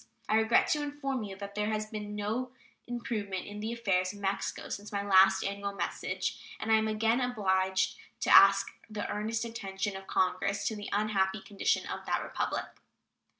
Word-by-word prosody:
I 215 - +3
regret 220 +1 +4
to 300 - +2
inform 285 -3 -3
you 200 -2 -6
that 200 0 -7
there 210 +1 -1
has 215 0 -1
been 210 -1 -6
no 220 +5 -2 0.4
improvement 225 -6 -3
in 205 0 -7
the 220 +2 -3
affairs 195 -5 0
of 205 - -11
Mexico 195 0 -2
since 205 +1 -6
my 200 -1 -1
last 190 -1 +6
annual 200 0 -3
message, 200 - -3 0.2
and 220 - -2
I - - +7
am 220 0 +1
again 225 +3 +2
obliged 190 -6 +1 0.2
to - - +5
ask 195 0 +7 0.2
the 210 -1 -4
earnest 220 +2 -1
attention 200 -3 -4
of 195 0 -8
Congress 185 +2 0
to 220 - -5
the 205 -1 -6
unhappy 205 -1 +1
condition 200 0 0
of - - -6
that - - 0
Republic. - - -2
205 Hz, 180 wpm, -31 LUFS, 195-220 Hz, 0.4 s, I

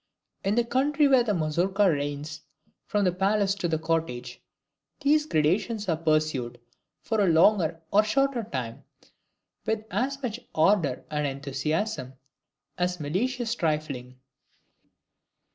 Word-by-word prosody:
In 200 +1 +1
the 240 - +3
country 280 +5 +2
where 265 -2 +5
the 210 -4 0
Mazourka 180 +5 +1
reigns 145 -1 -2 0.5
from 205 -1 +1
the 180 - +3
palace 195 +2 +1
to 195 -3 -2
the 160 -1 0
cottage, 160 -6 -2 0.6
these 300 +2 +3
gradations 200 - +1
are 165 - +2
pursued, 155 -7 0 0.4
for 220 -2 0
a 195 - +3
longer 165 0 +4
or 210 +2 +5
shorter 270 +3 +1
time, 125 - -5 0.8
with 220 -1 -1
as 270 +7 -1
much 235 -1 -3 0.2
ardor 160 -5 +2
and 150 -1 0
enthusiasm 140 +2 -2 0.7
as 180 0 0
malicious 230 - -1
trifling. 150 - -2
180 Hz, 125 wpm, -27 LUFS, 150-220 Hz, 0.8 s, where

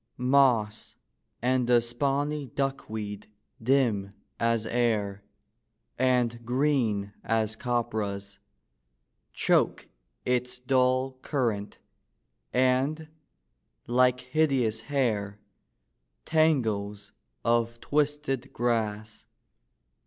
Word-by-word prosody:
Moss 125 -5 +2 0.5
and 125 0 +2
the 120 -1 +6
spawny 140 +4 -1
duckweed, 110 -6 -4 0.3
dim 110 -6 +1 0.2
as 115 -1 +1
air, 110 -4 0 0.8
And 125 -2 +1
green 120 -6 0
as 110 -1 0
copperas, 110 -5 -2 0.9
Choke - - +1 0.4
its 125 0 0
dull 130 0 +1
current; 115 -8 -2 0.7
and, 130 +5 +1 0.8
like 125 +1 +3
hideous 130 -5 +1
hair, 110 -7 -1 0.9
Tangles 110 -11 +1 0.3
of 115 0 +1
twisted 145 -2 -1
grass. 110 -3 -2
120 Hz, 70 wpm, -28 LUFS, 110-135 Hz, 0.9 s, the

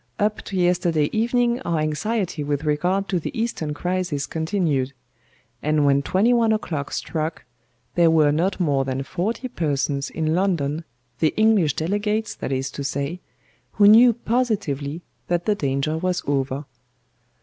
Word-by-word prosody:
Up 210 0 0
to 195 - -4
yesterday 175 -4 +2
evening 240 +2 +1
our 170 -8 -1
anxiety 160 +3 -1
with 145 +1 -2
regard 180 +6 0
to 180 - +1
the 170 - -5
Eastern 225 -10 -2
crisis 175 -4 -2
continued; 160 -6 -1 0.7
and 150 -1 +2
when 140 0 +4
twenty 200 +11 +2
one 230 -2 +3
o'clock 160 -10 -2
struck 160 0 -3 0.5
there 170 -1 +4
were 155 -2 +4
not 180 +6 0
more 145 -6 +2
than 135 0 -3
forty 215 - -3
persons 140 - -1
in 155 -1 -1
London 165 -4 0 0.3
the 155 - +1
English 215 -9 +3
delegates, 205 +6 -1
that - - -5
is 135 +1 -2
to 140 - -5
say 140 +5 -3 0.5
who 205 -1 +5
knew 235 +4 +8
positively 200 - -1 0.2
that 175 0 0
the 215 - +3
danger 140 -3 -1
was 180 0 -1
over. 140 0 -1
165 Hz, 150 wpm, -23 LUFS, 145-205 Hz, 0.7 s, knew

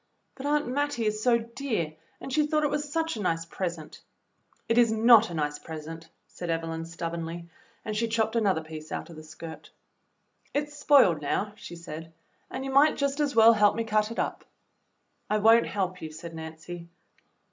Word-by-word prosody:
"But 275 +1 -6
Aunt 295 -1 +1
Mattie 280 -2 -1
is 215 0 0
so 240 0 +4
dear, 230 - -3 0.3
and 270 - -7
she 300 0 +3
thought 305 0 +1
it 295 - +1
was 295 0 -2
such 325 -1 0
a 215 - -4
nice 165 -3 0
present." 170 -2 -5 0.7
"It 230 +1 +3
is 235 -2 +5
not 225 0 +6
a 170 - -6
nice 150 -1 -1
present," 160 +1 -8 0.2
said 175 - -7
Evelyn 165 0 -2
stubbornly, 170 0 -5 0.4
and 215 - -3
she 230 +2 +1
chopped 220 0 0
another 195 -8 +2
piece 155 0 -9
out - - -5
of - - -11
the 155 - -10
skirt. 160 +1 -10 0.4
" - - -41
It 295 +1 0
's - - -12
spoiled 265 - +5
now," 200 +8 -1
she 175 - -9
said, 165 -1 -8 0.4
"and 265 +1 -5
you 270 - -3
might 285 +3 +5
just 280 +1 0
as 290 -4 0
well 225 0 +8
help 210 -2 +4
me 230 - -1
cut 215 -1 +1
it 230 - -7
up." - - -2 0.9
"I 215 - +2
won't 225 +2 +5
help 185 -3 -2
you," 155 - -6
said 165 +2 -9
Nancy. 160 +2 -8
210 Hz, 195 wpm, -28 LUFS, 165-245 Hz, 0.9 s, well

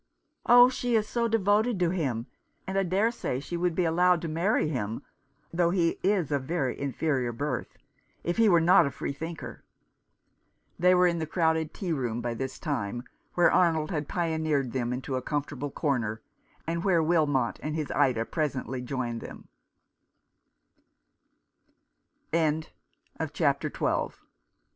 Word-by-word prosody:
" - - -51
Oh, 245 0 +9
she 245 -2 -1
is 215 -1 +2
so 235 -1 0
devoted 215 0 +2
to 175 -2 +2
him; 130 -11 -1 0.4
and 190 - -4
I 195 - +3
dare 195 +5 +1
say 130 - -3
she 145 +5 -6
would 175 -1 0
be 180 - +1
allowed 175 +2 +3
to - - -2
marry 165 +3 +1
him 115 -7 -3 0.2
— - - -40
though 170 0 +2
he 170 -2 +1
is 185 -6 +1
of 140 -2 +1
very 145 -4 -1
inferior 140 -2 -1
birth 130 +1 -4 0.2
— - - -40
if 175 - -1
he 225 -2 +5
were 175 -3 +6
not 165 -1 +5
a - - -1
free 140 - -4
thinker." 160 +3 -7 1.2
They 180 +1 +5
were 180 0 +5
in 170 -1 +1
the 160 - -3
crowded 160 -1 +1
tea 180 -5 -3
room 120 -5 -2
by 120 0 -2
this 130 +3 -5
time, 120 -6 -3 0.3
where 175 - +5
Arnold 160 -3 +2
had 150 -4 -2
pioneered 160 -7 0
them 120 -1 -2
into 130 +1 -3
a - - -3
comfortable 145 0 -3
corner, 120 -8 -2 0.4
and 170 +1 -2
where 175 -4 +3
Wilmot 150 -7 +1
160 Hz, 140 wpm, -28 LUFS, 135-180 Hz, 1.2 s, Oh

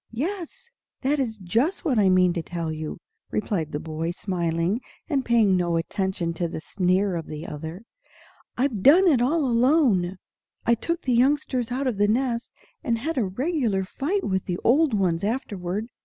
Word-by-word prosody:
"Yes, 370 - -4 0.3
that 280 +2 +1
is 230 -5 -2
just 230 - 0
what 260 -8 +2
I 195 -2 +4
mean 185 -1 +4
to 170 - -2
tell 165 -1 -4
you," 155 0 -5 0.3
replied 185 -7 -2
the 145 - -3
boy, 160 +1 -4
smiling, 175 +3 -1 0.3
and 280 -5 0
paying 225 -6 +4
no 175 -2 +1
attention 180 0 -2
to 170 +1 -2
the 165 - -5
sneer 185 +2 0
of 165 -2 -4
the 155 +1 -6
other. 160 +6 -7 0.7
"I've 245 -6 0
done 340 - +7
it 275 -8 +4
all 295 +4 +2
alone. 235 - +3 0.5
I 235 - +4
took 335 +9 -2
the 255 - +1
youngsters 255 -1 +1
out 265 +3 -1
of 240 -6 -1
the 205 - +4
nest, 235 +1 0 0.3
and 230 -1 +1
had 310 +8 -3
a 225 - +1
regular 235 - 0
fight 305 - -2
with 190 -2 -1
the 175 - -2
old 275 0 +4
ones 180 -4 +1
afterward. 205 -3 -2
215 Hz, 175 wpm, -25 LUFS, 180-265 Hz, 0.7 s, done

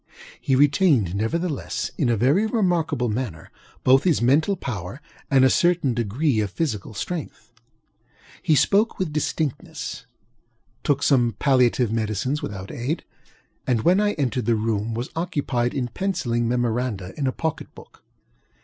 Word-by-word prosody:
He 135 -4 +1
retained, 140 - +3
nevertheless, 145 - -2
in 130 - 0
a 115 - +2
very 140 - +3
remarkable 170 - 0
manner, 105 -8 -4 0.3
both 130 +2 +5
his 175 -4 +2
mental 150 +11 +3
power 110 - -5 0.3
and 135 -2 +5
a - - +6
certain 170 -7 +2
degree 120 +3 0
of 105 -2 0
physical 110 - -3
strength. 165 - -6 0.9
He 155 - +3
spoke 205 - +3
with 175 -5 -2
distinctnessŌĆötook 150 -1 -3 1.0
some 120 -6 +3
palliative 125 -4 +3
medicines 110 +5 -1
without 100 -1 -6
aidŌĆöand, 125 -3 -5
when 180 +3 +4
I 210 0 +2
entered 130 -3 -2
the 115 - +3
room, 110 0 -1
was 120 +3 -4
occupied 145 -8 -1
in 130 -3 -1
penciling 120 - -1
memoranda 120 -5 -1
in 140 -3 -1
a - - +1
pocket 160 +3 -4
book. - - -16
130 Hz, 135 wpm, -23 LUFS, 115-160 Hz, 1.0 s, a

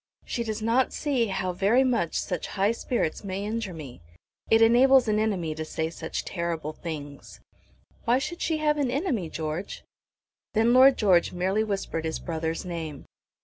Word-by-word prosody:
"She 235 - -2
does 220 -1 -4
not 240 +4 +2
see 265 -6 0
how 190 -2 -2
very 200 +8 +3
much 235 -10 0
such 180 - -3
high 200 +3 +3
spirits 230 -7 -2
may 195 0 -4
injure 220 -2 -3
me. 145 - -9 0.5
It 225 - +5
enables 245 +3 +6
an 215 0 +2
enemy 190 -8 -1
to 155 0 -5
say 160 +1 -3
such 160 -1 -5
terrible 165 -3 -3
things." 145 -4 -8 0.7
"Why 240 +2 +4
should 345 +6 -4
she 320 - 0
have 300 -1 +1
an 275 -3 +1
enemy, 250 - -1
George?" 155 +4 -5 0.7
Then 225 +2 +4
Lord 260 +1 +7
George 185 -5 +3
merely 190 +4 +1
whispered 195 -6 -3
his 160 - -2
brother's 160 0 -3
name. 165 -5 -6
200 Hz, 165 wpm, -26 LUFS, 165-235 Hz, 0.7 s, Lord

